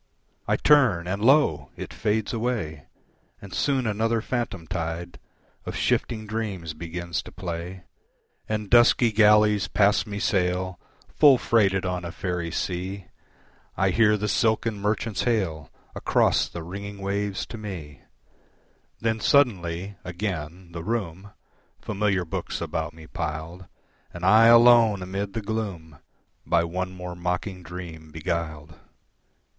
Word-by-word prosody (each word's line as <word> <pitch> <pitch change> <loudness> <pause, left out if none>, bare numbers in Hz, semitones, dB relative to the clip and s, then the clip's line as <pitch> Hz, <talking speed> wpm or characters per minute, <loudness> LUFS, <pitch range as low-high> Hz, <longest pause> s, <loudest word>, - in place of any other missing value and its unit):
I - - +3
turn, 130 - +4
and 100 +3 -2
lo! 115 - +4
it - - -7
fades 110 +1 -1
away, 110 - -3 0.5
And 100 -1 -11
soon 135 -3 +1
another 115 +2 +1
phantom 115 -7 -3
tide 85 0 -4 0.4
Of - - -6
shifting 110 -2 0
dreams 105 -7 -4
begins 85 +1 -4
to - - -12
play, 90 0 -6 0.7
And 105 -1 -2
dusky 120 0 +5
galleys 105 -2 +4
past 100 +3 +2
me 100 -1 -5
sail, 95 -2 0 0.3
Full 145 -4 +7
freighted 95 -6 +2
on 90 -1 -2
a 85 - -5
faerie 90 -3 -3
sea; 95 +3 -4 0.7
I 95 0 +2
hear 105 +2 +4
the 105 +1 -2
silken 110 +1 +1
merchants 105 0 -1
hail 95 -11 -1 0.2
Across - - +2
the 85 - -7
ringing 100 +4 -7
waves 100 0 -2
to 115 - -9
me 85 -9 -8 1.0
Then 110 -1 0
suddenly, 100 - +1
again, 90 -2 -5
the 85 -1 -6
room, 100 -3 -3 0.5
Familiar 100 -3 0
books 80 - -4
about 80 0 -3
me 80 -1 -12
piled, 80 +4 -5 0.4
And 90 +1 -5
I 110 +4 +7
alone 115 -4 +6
amid 95 +2 -4
the 115 - -4
gloom, 100 -8 -4 0.4
By 85 -1 +2
one 90 +2 -3
more 90 -1 -7
mocking 90 +2 -3
dream 85 -2 -9
beguiled. 80 -1 -4
95 Hz, 130 wpm, -25 LUFS, 85-110 Hz, 1.0 s, Full